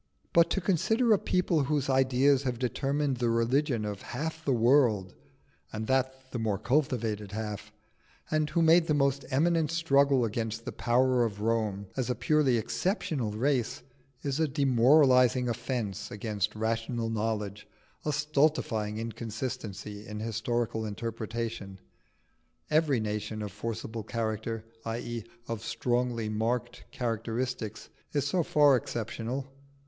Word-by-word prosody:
But 170 Hz, 0 st, +5 dB
to 195 Hz, -, 0 dB
consider 220 Hz, +6 st, +3 dB
a 200 Hz, -, +3 dB
people 170 Hz, -5 st, +1 dB
whose 145 Hz, -1 st, 0 dB
ideas 135 Hz, +1 st, +3 dB
have 125 Hz, -3 st, -2 dB
determined 135 Hz, +3 st, 0 dB
the 120 Hz, -1 st, +1 dB
religion 115 Hz, +1 st, +1 dB
of 105 Hz, -2 st, -4 dB
half 160 Hz, +5 st, -5 dB
the 140 Hz, -, +1 dB
world, 115 Hz, -6 st, +3 dB, 0.6 s
and 110 Hz, 0 st, -4 dB
that 130 Hz, +1 st, -1 dB
the 125 Hz, -, -3 dB
more 110 Hz, -3 st, 0 dB
cultivated 115 Hz, -6 st, 0 dB
half, 105 Hz, 0 st, -5 dB, 0.6 s
and 155 Hz, -1 st, +1 dB
who 165 Hz, +3 st, +2 dB
made 165 Hz, +1 st, +5 dB
the 150 Hz, -, +2 dB
most 140 Hz, -1 st, +1 dB
eminent 160 Hz, +3 st, +2 dB
struggle 140 Hz, -6 st, +3 dB
against 115 Hz, +1 st, -3 dB
the -, -, -3 dB
power 125 Hz, +1 st, +2 dB
of 105 Hz, -3 st, -3 dB
Rome, 110 Hz, -3 st, 0 dB
as 130 Hz, -2 st, -1 dB
a 125 Hz, -, +1 dB
purely 130 Hz, +1 st, +3 dB
exceptional 135 Hz, -, -1 dB
race, 125 Hz, +1 st, 0 dB, 0.4 s
is 140 Hz, +1 st, -1 dB
a 160 Hz, -, +3 dB
demoralising 130 Hz, -2 st, +4 dB
offence 115 Hz, -4 st, -3 dB
against 105 Hz, -1 st, -2 dB
rational 115 Hz, +1 st, -1 dB
knowledge, 105 Hz, -2 st, -2 dB, 0.4 s
a 150 Hz, -, 0 dB
stultifying 145 Hz, -8 st, +1 dB
inconsistency 110 Hz, -2 st, -5 dB
in 105 Hz, 0 st, -6 dB
historical 115 Hz, +1 st, -1 dB
interpretation. 110 Hz, -2 st, -4 dB, 0.9 s
Every 150 Hz, -4 st, +3 dB
nation 105 Hz, 0 st, -3 dB
of 105 Hz, -, -5 dB
forcible 115 Hz, +2 st, -5 dB
character 110 Hz, 0 st, -3 dB, 0.2 s
i.e., 115 Hz, 0 st, -4 dB, 0.2 s
of 115 Hz, -1 st, -4 dB
strongly 120 Hz, 0 st, -1 dB
marked 110 Hz, +3 st, -2 dB
characteristics, 115 Hz, -1 st, -3 dB, 0.2 s
is 145 Hz, -2 st, +1 dB
so 175 Hz, +5 st, +1 dB
far 145 Hz, -3 st, +5 dB
exceptional. 120 Hz, +2 st, -3 dB
120 Hz, 130 wpm, -29 LUFS, 110-140 Hz, 0.9 s, But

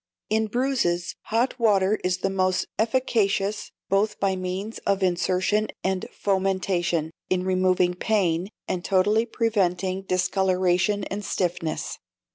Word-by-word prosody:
In 220 Hz, 0 st, +2 dB
bruises, 235 Hz, -8 st, 0 dB
hot 240 Hz, +4 st, 0 dB
water 210 Hz, -2 st, +3 dB
is 180 Hz, 0 st, +1 dB
the 195 Hz, -, 0 dB
most 185 Hz, -1 st, +1 dB
efficacious, 215 Hz, -4 st, +1 dB, 0.2 s
both 205 Hz, +2 st, +1 dB
by 195 Hz, -1 st, +1 dB
means 185 Hz, +4 st, -4 dB
of 195 Hz, -1 st, 0 dB
insertion 185 Hz, +4 st, +1 dB, 0.2 s
and 190 Hz, -1 st, -1 dB
fomentation, 185 Hz, -4 st, 0 dB, 0.2 s
in 185 Hz, 0 st, +1 dB
removing 185 Hz, -1 st, +2 dB
pain, 180 Hz, -3 st, 0 dB, 0.2 s
and 180 Hz, -1 st, -2 dB
totally 205 Hz, +5 st, +2 dB
preventing 190 Hz, -5 st, 0 dB
discoloration 185 Hz, +1 st, +1 dB
and 200 Hz, +2 st, -4 dB
stiffness. 175 Hz, -5 st, -2 dB
190 Hz, 115 wpm, -25 LUFS, 185-210 Hz, 0.2 s, water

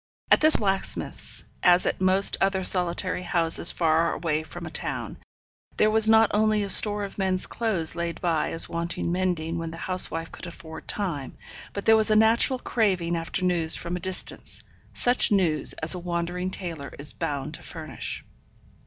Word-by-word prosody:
At -, -, +5 dB
this 310 Hz, 0 st, +9 dB
blacksmith's, 195 Hz, -2 st, -2 dB, 0.2 s
as 180 Hz, 0 st, +4 dB
at -, -, -2 dB
most 190 Hz, +1 st, +5 dB
other 195 Hz, -1 st, 0 dB
solitary 180 Hz, 0 st, 0 dB
houses 170 Hz, -1 st, +2 dB
far 165 Hz, 0 st, +1 dB
away 155 Hz, -2 st, -2 dB
from 155 Hz, -, -10 dB
a -, -, -8 dB
town, -, -, -5 dB, 0.6 s
there 215 Hz, -, +3 dB
was 220 Hz, 0 st, +4 dB
not 225 Hz, -1 st, +4 dB
only 215 Hz, 0 st, +1 dB
a 200 Hz, -, -5 dB
store 205 Hz, +1 st, +7 dB
of 200 Hz, 0 st, -8 dB
men's 185 Hz, -1 st, 0 dB
clothes 205 Hz, -9 st, -2 dB
laid 170 Hz, -1 st, -4 dB
by 165 Hz, -3 st, -1 dB
as 165 Hz, -, +1 dB
wanting 170 Hz, 0 st, -4 dB
mending 175 Hz, -2 st, -2 dB
when 165 Hz, 0 st, -5 dB
the 165 Hz, -, -9 dB
housewife 165 Hz, -3 st, -2 dB
could -, -, -10 dB
afford 160 Hz, -2 st, -11 dB
time, 165 Hz, -10 st, -5 dB, 0.3 s
but 200 Hz, -, -7 dB
there 220 Hz, -, +5 dB
was 220 Hz, 0 st, +2 dB
a 215 Hz, -, +3 dB
natural 225 Hz, +4 st, +3 dB
craving 190 Hz, -9 st, -1 dB
after 165 Hz, +2 st, -3 dB
news 170 Hz, -3 st, +1 dB
from 175 Hz, +1 st, -5 dB
a -, -, -4 dB
distance, 185 Hz, +1 st, -3 dB, 0.3 s
such 245 Hz, -1 st, +1 dB
news 170 Hz, -8 st, +1 dB
as 160 Hz, +2 st, +2 dB
a 180 Hz, -, -6 dB
wandering 175 Hz, +1 st, -4 dB
tailor 170 Hz, -6 st, -7 dB
is 145 Hz, +1 st, 0 dB
bound 145 Hz, +1 st, -5 dB
to -, -, -10 dB
furnish. -, -, -7 dB
180 Hz, 175 wpm, -24 LUFS, 165-200 Hz, 0.6 s, this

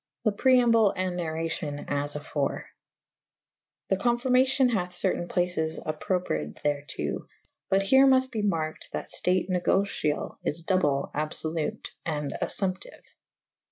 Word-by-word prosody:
The 215 Hz, -, +4 dB
preamble 230 Hz, -2 st, +4 dB
and 185 Hz, -1 st, -1 dB
narracion 160 Hz, -3 st, -3 dB
as 145 Hz, +1 st, -1 dB
afore. 145 Hz, -1 st, -2 dB, 1.2 s
The 190 Hz, -, +2 dB
confirmacion 255 Hz, +3 st, +3 dB
hath 180 Hz, -5 st, -1 dB
certayn 175 Hz, -1 st, -1 dB
places 175 Hz, -3 st, 0 dB
appropred 155 Hz, -, -2 dB
thereto 145 Hz, -2 st, -2 dB, 0.2 s
/ -, -, -40 dB
but 195 Hz, +1 st, +3 dB
here 265 Hz, +6 st, +6 dB
mufte 260 Hz, -1 st, +4 dB
be 220 Hz, -4 st, -2 dB
marked 160 Hz, -6 st, -2 dB
that -, -, -4 dB
ftate 180 Hz, 0 st, +1 dB
negocyall 180 Hz, -4 st, 0 dB
is 165 Hz, +3 st, -2 dB
double 150 Hz, -7 st, +1 dB
/ -, -, -34 dB
abfblute 155 Hz, +6 st, -3 dB
/ -, -, -49 dB
and 150 Hz, -1 st, -3 dB
affumptyue. 185 Hz, -1 st, 0 dB
180 Hz, 125 wpm, -27 LUFS, 155-210 Hz, 1.2 s, here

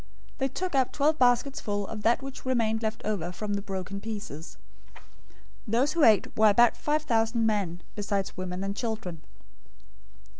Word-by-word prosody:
They 265 Hz, -, +2 dB
took 360 Hz, +7 st, -4 dB
up 265 Hz, -2 st, +2 dB
twelve 305 Hz, +2 st, +1 dB
baskets 250 Hz, +2 st, +3 dB
full 205 Hz, -1 st, -2 dB
of 215 Hz, +2 st, -6 dB
that 235 Hz, +4 st, +2 dB
which 270 Hz, 0 st, -8 dB
remained 230 Hz, -4 st, +1 dB
left 220 Hz, -1 st, -3 dB
over 185 Hz, -5 st, -2 dB
from 205 Hz, +3 st, -4 dB
the 200 Hz, -, -1 dB
broken 195 Hz, 0 st, -5 dB
pieces. 210 Hz, -7 st, -7 dB, 0.4 s
014:021 -, -, -17 dB, 0.7 s
Those 260 Hz, +6 st, +3 dB
who 330 Hz, -1 st, +1 dB
ate 215 Hz, -6 st, +4 dB
were 215 Hz, 0 st, +6 dB
about 235 Hz, +3 st, +5 dB
five 300 Hz, +1 st, 0 dB
thousand 225 Hz, -4 st, +1 dB
men, 195 Hz, -6 st, -1 dB
besides 200 Hz, -2 st, -2 dB
women 185 Hz, 0 st, -4 dB
and 195 Hz, 0 st, -3 dB
children. 220 Hz, -9 st, -4 dB
220 Hz, 165 wpm, -28 LUFS, 200-245 Hz, 0.7 s, were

